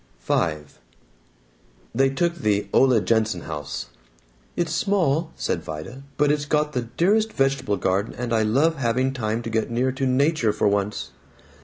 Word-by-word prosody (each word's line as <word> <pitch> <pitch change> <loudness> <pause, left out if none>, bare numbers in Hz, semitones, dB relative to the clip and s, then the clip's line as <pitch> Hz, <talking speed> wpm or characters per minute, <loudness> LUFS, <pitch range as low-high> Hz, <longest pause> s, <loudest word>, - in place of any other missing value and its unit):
V - - -1 1.6
They 135 +3 +3
took 170 +5 0
the 105 -11 0
Ole 130 -4 +5
Jenson 110 -1 +1
house. 75 -3 -5 0.7
"It's 165 -2 -1
small," 165 -4 +1
said - - -2
Vida, 80 - -7 0.2
"but 145 0 +3
it's 145 -1 0
got 150 0 0
the 125 - 0 0.2
dearest 215 +5 +3
vegetable 135 - 0
garden, 95 +3 -1
and 120 -1 -3
I 110 - +3
love 140 +10 +2
having 130 +1 0
time 115 -2 -2
to 115 - -4
get 110 0 0
near 125 +3 +1
to 130 +1 -2
Nature 130 -3 +2
for 105 - +1
once." 100 0 -1
130 Hz, 155 wpm, -23 LUFS, 110-150 Hz, 1.6 s, Ole